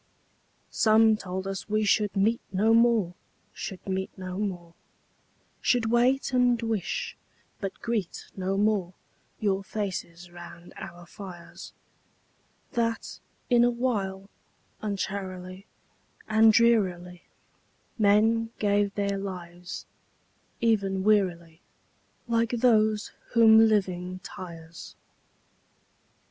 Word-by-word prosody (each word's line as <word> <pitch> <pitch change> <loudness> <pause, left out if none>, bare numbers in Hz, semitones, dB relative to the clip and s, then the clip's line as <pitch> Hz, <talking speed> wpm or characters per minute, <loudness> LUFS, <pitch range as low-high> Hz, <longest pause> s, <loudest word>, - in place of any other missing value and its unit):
III - - -40
Some 220 0 +5
told 190 -2 -5
us 195 +2 -5
we 215 +1 +1
should 210 0 +2
meet 220 +4 +2
no 210 +4 +3
more, 230 -6 +3 0.4
Should 190 - -7
meet 190 0 -2
no 185 0 -5
more; 175 -5 -4 0.9
Should 225 -3 +2
wait, 250 +2 +2
and 245 -1 +3
wish, 225 -5 -2 0.4
but 195 -1 -5
greet 225 -6 -2
no 190 0 -1
more 200 -4 +1 0.4
Your 195 -2 0
faces 180 -4 -5
round 175 0 -12
our 175 0 -9
fires; 175 -1 -10 1.0
That, 230 -1 -2 0.3
in 240 -1 +6
a 245 - +5
while, 205 -6 -2 0.5
uncharily 190 -2 -5 0.6
And 220 +1 +6
drearily 185 -7 +2 0.8
Men 220 +2 +3
gave 205 -1 +1
their 200 -1 -1
lives—even 190 +2 -4
wearily, 175 -6 +1 0.7
Like 230 -1 +1
those 220 -3 +2 0.2
whom 225 -1 +7
living 185 -4 0
tires. 165 -2 -10
200 Hz, 100 wpm, -27 LUFS, 185-225 Hz, 1.0 s, whom